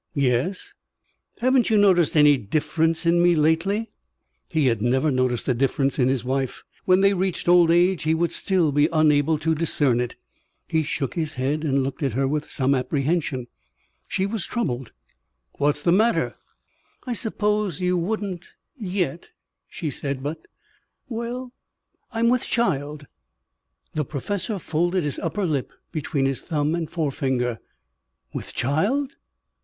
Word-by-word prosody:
"Yes?" 140 Hz, +7 st, 0 dB, 0.7 s
"Haven't 255 Hz, 0 st, +3 dB
you 220 Hz, -, +4 dB
noticed 180 Hz, -6 st, +4 dB
any 150 Hz, -1 st, +7 dB
difference 160 Hz, -, 0 dB
in 170 Hz, +1 st, +4 dB
me 175 Hz, 0 st, +5 dB
lately?" 165 Hz, +8 st, +1 dB, 0.6 s
He 160 Hz, -4 st, +1 dB
had 115 Hz, -5 st, +1 dB
never 130 Hz, +6 st, +2 dB
noticed 130 Hz, -2 st, 0 dB
a 130 Hz, -, +3 dB
difference 135 Hz, +2 st, 0 dB
in 125 Hz, -, +4 dB
his 130 Hz, -2 st, 0 dB
wife. 130 Hz, 0 st, -2 dB, 0.2 s
When 185 Hz, +1 st, +4 dB
they 200 Hz, 0 st, +5 dB
reached 185 Hz, -2 st, -2 dB
old 175 Hz, -1 st, +6 dB
age, 175 Hz, -1 st, +3 dB
he 160 Hz, +1 st, +1 dB
would 170 Hz, +1 st, 0 dB
still 180 Hz, -6 st, +1 dB
be 145 Hz, +2 st, +3 dB
unable 155 Hz, -1 st, +3 dB
to 160 Hz, +2 st, 0 dB
discern 150 Hz, -6 st, +1 dB
it. 120 Hz, -1 st, -4 dB, 0.5 s
He 160 Hz, -, +1 dB
shook 140 Hz, -3 st, -3 dB
his 155 Hz, -2 st, -2 dB
head 140 Hz, +4 st, -1 dB
and 140 Hz, -3 st, +1 dB
looked 135 Hz, +2 st, -4 dB
at 135 Hz, -5 st, 0 dB
her 135 Hz, +3 st, +1 dB
with 150 Hz, +2 st, -2 dB
some 135 Hz, -1 st, +1 dB
apprehension. 140 Hz, 0 st, -1 dB, 0.6 s
She 190 Hz, -, -1 dB
was 200 Hz, -1 st, -3 dB
troubled. 130 Hz, -, -3 dB, 0.7 s
"What's 145 Hz, +1 st, +1 dB
the 170 Hz, -, +3 dB
matter?" 220 Hz, +6 st, +2 dB, 0.7 s
"I 250 Hz, -, -2 dB
suppose 210 Hz, -5 st, 0 dB
you 180 Hz, 0 st, +1 dB
wouldn't 185 Hz, 0 st, -2 dB, 0.3 s
yet," 180 Hz, -, -3 dB, 0.4 s
she 155 Hz, -4 st, -4 dB
said. 140 Hz, -1 st, -4 dB
"But 155 Hz, +2 st, -5 dB, 0.6 s
well 245 Hz, +2 st, -5 dB, 0.6 s
I'm 230 Hz, 0 st, +1 dB
with 250 Hz, 0 st, +2 dB
child." 150 Hz, -, -1 dB, 0.9 s
The 150 Hz, -2 st, -1 dB
professor 200 Hz, -, -3 dB
folded 175 Hz, +1 st, 0 dB
his 145 Hz, -2 st, -2 dB
upper 205 Hz, -2 st, -2 dB
lip 145 Hz, -6 st, -1 dB, 0.2 s
between 145 Hz, -3 st, -1 dB
his 135 Hz, -1 st, 0 dB
thumb 150 Hz, -2 st, -1 dB
and 165 Hz, -2 st, -2 dB
forefinger. 130 Hz, -7 st, -1 dB, 0.7 s
"With -, -, -6 dB
child? 210 Hz, -, 0 dB
160 Hz, 150 wpm, -24 LUFS, 140-185 Hz, 0.9 s, any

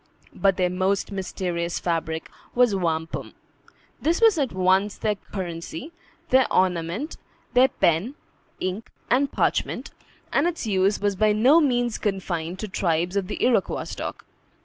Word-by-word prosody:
But 195 Hz, -2 st, +2 dB
their 180 Hz, -1 st, +1 dB
most 190 Hz, +3 st, 0 dB
mysterious 180 Hz, -3 st, -3 dB
fabric 165 Hz, -2 st, -2 dB, 0.3 s
was 245 Hz, -3 st, +4 dB
wampum. 165 Hz, -3 st, -2 dB, 0.7 s
This 330 Hz, +3 st, +1 dB
was 445 Hz, -7 st, +5 dB
at 270 Hz, -4 st, 0 dB
once 190 Hz, +2 st, +2 dB
their 215 Hz, -1 st, 0 dB
currency, 180 Hz, -, -6 dB, 0.4 s
their 260 Hz, -1 st, +4 dB
ornament, 185 Hz, -, 0 dB, 0.4 s
their 255 Hz, +1 st, +6 dB
pen, 185 Hz, -, +1 dB, 0.4 s
ink, 190 Hz, +5 st, -3 dB, 0.2 s
and 270 Hz, +3 st, +3 dB
parchment; -, -, -1 dB, 0.4 s
and 290 Hz, +5 st, +3 dB
its 345 Hz, -7 st, -3 dB
use 195 Hz, -1 st, +2 dB
was 205 Hz, -1 st, 0 dB
by 215 Hz, +2 st, +3 dB
no 255 Hz, +10 st, +6 dB
means 245 Hz, -5 st, +1 dB
confined 180 Hz, -4 st, -2 dB
to 215 Hz, -, -3 dB
tribes 175 Hz, -1 st, 0 dB
of 195 Hz, -2 st, 0 dB
the 210 Hz, -, -1 dB
Iroquois 250 Hz, -1 st, +1 dB
stock. -, -, -6 dB
195 Hz, 140 wpm, -24 LUFS, 180-245 Hz, 0.7 s, their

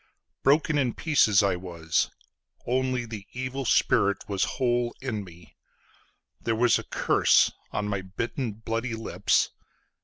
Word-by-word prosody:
Broken 150 Hz, +2 st, +3 dB
in 125 Hz, -4 st, 0 dB
pieces 115 Hz, -11 st, +3 dB
I 100 Hz, -2 st, +2 dB
was—only 105 Hz, -, -3 dB
the 110 Hz, -3 st, -8 dB
evil 130 Hz, +1 st, -4 dB
spirit 100 Hz, -3 st, +2 dB
was 100 Hz, -2 st, 0 dB
whole 120 Hz, -1 st, +1 dB
in 115 Hz, -6 st, -3 dB
me; 85 Hz, -3 st, -15 dB, 0.9 s
There 115 Hz, -, 0 dB
was 120 Hz, +1 st, +3 dB
a -, -, -7 dB
curse -, -, +3 dB, 0.2 s
on 105 Hz, -, -2 dB
my 100 Hz, -2 st, -2 dB
bitten 110 Hz, +5 st, -4 dB
bloody 115 Hz, +2 st, -3 dB
lips…. 110 Hz, 0 st, +1 dB
115 Hz, 125 wpm, -27 LUFS, 100-130 Hz, 0.9 s, Broken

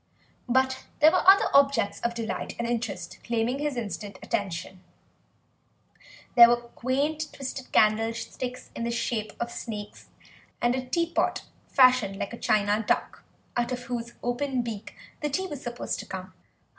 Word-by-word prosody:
But 260 Hz, +1 st, +2 dB
there 310 Hz, +2 st, +7 dB
were -, -, +3 dB
other 395 Hz, +2 st, +8 dB
objects 275 Hz, -7 st, +4 dB
of 235 Hz, 0 st, -1 dB
delight 230 Hz, -1 st, -4 dB
and 235 Hz, -, -2 dB
interest 220 Hz, -7 st, -3 dB
claiming 235 Hz, +3 st, 0 dB
his 295 Hz, -3 st, -2 dB
instant 205 Hz, -3 st, -5 dB
attention: 185 Hz, -1 st, -3 dB, 1.5 s
there 235 Hz, -1 st, +10 dB
were 240 Hz, -, +4 dB, 0.2 s
quaint 295 Hz, +5 st, -1 dB
twisted 265 Hz, -1 st, -6 dB
candlesticks 230 Hz, +4 st, 0 dB
in 235 Hz, -, -3 dB
the 235 Hz, -, -1 dB
shape 235 Hz, -2 st, -2 dB
of 235 Hz, 0 st, -3 dB
snakes, 210 Hz, -3 st, -7 dB, 0.5 s
and 240 Hz, 0 st, +2 dB
a 255 Hz, 0 st, -3 dB
teapot 335 Hz, +5 st, 0 dB, 0.2 s
fashioned 255 Hz, -7 st, +4 dB
like 200 Hz, -, -4 dB
a 235 Hz, -, -7 dB
china 210 Hz, -1 st, +2 dB
duck, -, -, 0 dB, 0.3 s
out 240 Hz, +1 st, 0 dB
of 245 Hz, 0 st, -3 dB
whose 235 Hz, -1 st, -4 dB
open 250 Hz, +1 st, -1 dB
beak 220 Hz, -2 st, -6 dB, 0.3 s
the 300 Hz, -, 0 dB
tea 375 Hz, +7 st, -1 dB
was 295 Hz, -7 st, -6 dB
supposed 240 Hz, 0 st, -4 dB
to -, -, -7 dB
come. -, -, -7 dB
240 Hz, 150 wpm, -27 LUFS, 220-260 Hz, 1.5 s, there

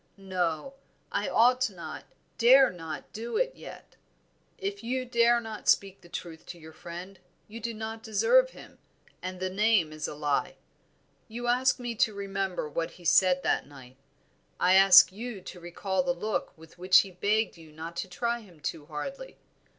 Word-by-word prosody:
No, 185 Hz, -, -2 dB, 0.4 s
I 200 Hz, 0 st, -1 dB
ought 250 Hz, +2 st, +4 dB
not, 180 Hz, -4 st, -9 dB, 0.3 s
dare 260 Hz, +3 st, +7 dB
not 165 Hz, -4 st, -8 dB
do 230 Hz, -, -4 dB
it -, -, 0 dB
yet." -, -, -12 dB, 0.6 s
"If 400 Hz, +1 st, -5 dB
you 255 Hz, +2 st, -2 dB
dare 235 Hz, -1 st, +3 dB
not 220 Hz, -2 st, -5 dB
speak 195 Hz, -1 st, +2 dB
the 175 Hz, -, -17 dB
truth 165 Hz, -2 st, -7 dB
to 175 Hz, -, -8 dB
your 160 Hz, -1 st, -13 dB
friend, 175 Hz, +4 st, -9 dB, 0.3 s
you 225 Hz, +2 st, -9 dB
do 235 Hz, +1 st, -3 dB
not 220 Hz, 0 st, -6 dB
deserve 480 Hz, -, +3 dB
him, -, -, -15 dB, 0.4 s
and 185 Hz, 0 st, -6 dB
the 185 Hz, 0 st, -2 dB
name 200 Hz, -5 st, +2 dB
is 155 Hz, -, -4 dB
a -, -, -7 dB
lie. 145 Hz, -1 st, -1 dB, 0.7 s
You 235 Hz, +2 st, -6 dB
ask 250 Hz, +2 st, +2 dB
me 240 Hz, -1 st, -4 dB
to 215 Hz, -1 st, +1 dB
remember 195 Hz, -4 st, -3 dB
what 165 Hz, +2 st, -3 dB
he 175 Hz, -, -16 dB
said 180 Hz, +1 st, +4 dB
that -, -, 0 dB
night, 130 Hz, -3 st, -14 dB, 0.6 s
I 180 Hz, +1 st, +4 dB
ask 190 Hz, -1 st, +8 dB
you 225 Hz, +1 st, -7 dB
to 180 Hz, 0 st, -10 dB
recall 185 Hz, +4 st, -2 dB
the 265 Hz, -1 st, 0 dB
look 215 Hz, -7 st, -3 dB
with 160 Hz, +2 st, -17 dB
which 185 Hz, 0 st, +6 dB
he 195 Hz, -, -9 dB
begged 205 Hz, +4 st, 0 dB
you 160 Hz, -2 st, -15 dB
not 160 Hz, +2 st, -8 dB
to 175 Hz, -, -3 dB
try 235 Hz, +7 st, -2 dB
him 185 Hz, -8 st, -17 dB
too 150 Hz, 0 st, -5 dB
hardly. 270 Hz, -, -7 dB
195 Hz, 175 wpm, -28 LUFS, 175-235 Hz, 0.7 s, ask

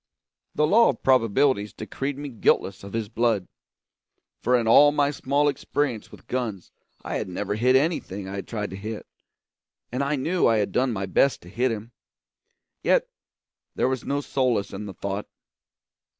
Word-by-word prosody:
The 150 Hz, -, +3 dB
law 225 Hz, +9 st, +5 dB
of -, -, -3 dB
probabilities 115 Hz, -3 st, +3 dB
decreed 135 Hz, +5 st, -4 dB
me 145 Hz, 0 st, -5 dB
guiltless 100 Hz, -5 st, +1 dB
of 100 Hz, -, -9 dB
his 115 Hz, -2 st, -2 dB
blood; 115 Hz, -4 st, 0 dB, 0.9 s
for 125 Hz, +2 st, +3 dB
in 115 Hz, -2 st, -1 dB
all 145 Hz, +6 st, +7 dB
my 145 Hz, -1 st, +2 dB
small 145 Hz, +1 st, +1 dB
experience 140 Hz, -4 st, -2 dB
with -, -, -14 dB
guns 115 Hz, -7 st, -4 dB, 0.3 s
I -, -, -3 dB
had -, -, -4 dB
never 100 Hz, +3 st, -3 dB
hit 125 Hz, +5 st, +3 dB
anything 130 Hz, -, 0 dB
I 100 Hz, +1 st, -5 dB
had 100 Hz, -, -6 dB
tried 105 Hz, -3 st, -4 dB
to -, -, -6 dB
hit, 105 Hz, +2 st, -6 dB, 0.9 s
and 130 Hz, +3 st, -1 dB
I 140 Hz, +2 st, 0 dB
knew 165 Hz, +7 st, +1 dB
I 115 Hz, -, +3 dB
had 105 Hz, -2 st, 0 dB
done 130 Hz, 0 st, +1 dB
my 95 Hz, -3 st, -2 dB
best 130 Hz, +8 st, +2 dB
to 90 Hz, -, -12 dB
hit 125 Hz, +5 st, 0 dB
him. 110 Hz, +1 st, -6 dB, 0.9 s
Yet -, -, +2 dB, 0.7 s
there -, -, +1 dB
was 130 Hz, -2 st, -2 dB
no 140 Hz, +1 st, -1 dB
solace 125 Hz, -8 st, 0 dB
in 105 Hz, +2 st, -6 dB
the 95 Hz, -, -8 dB
thought. 100 Hz, +1 st, -4 dB
120 Hz, 175 wpm, -25 LUFS, 105-140 Hz, 0.9 s, all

